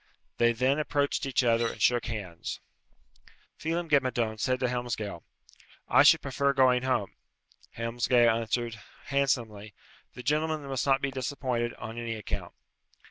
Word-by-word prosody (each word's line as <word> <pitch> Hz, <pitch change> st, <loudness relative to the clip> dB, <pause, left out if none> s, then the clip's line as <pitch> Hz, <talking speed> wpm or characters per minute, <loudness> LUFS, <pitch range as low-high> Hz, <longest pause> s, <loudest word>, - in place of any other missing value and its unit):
They 120 Hz, 0 st, +5 dB
then 130 Hz, +5 st, +1 dB
approached 145 Hz, -2 st, 0 dB
each 135 Hz, -1 st, +1 dB
other 115 Hz, -1 st, +3 dB
and -, -, -12 dB
shook 120 Hz, -2 st, +2 dB
hands. 100 Hz, -7 st, -5 dB, 1.0 s
Phelem 165 Hz, +2 st, -2 dB
ghe 145 Hz, -3 st, +5 dB
Madone 120 Hz, -4 st, -2 dB
said 130 Hz, +2 st, 0 dB
to -, -, +2 dB
Helmsgail, 120 Hz, -7 st, -3 dB, 0.7 s
"I -, -, +6 dB
should -, -, +6 dB
prefer 140 Hz, 0 st, 0 dB
going 130 Hz, -2 st, +4 dB
home." 125 Hz, -6 st, -1 dB, 0.6 s
Helmsgail 120 Hz, 0 st, +3 dB
answered, 115 Hz, 0 st, -2 dB, 0.3 s
handsomely, 115 Hz, -7 st, -1 dB, 0.4 s
"The 125 Hz, -, -8 dB
gentlemen 155 Hz, +2 st, 0 dB
must 135 Hz, -1 st, -2 dB
not 135 Hz, -1 st, +3 dB
be 140 Hz, -, 0 dB
disappointed, 130 Hz, -2 st, -2 dB
on 115 Hz, +1 st, -7 dB
any 115 Hz, -1 st, -3 dB
account." 105 Hz, -, -6 dB
125 Hz, 140 wpm, -28 LUFS, 115-135 Hz, 1.0 s, I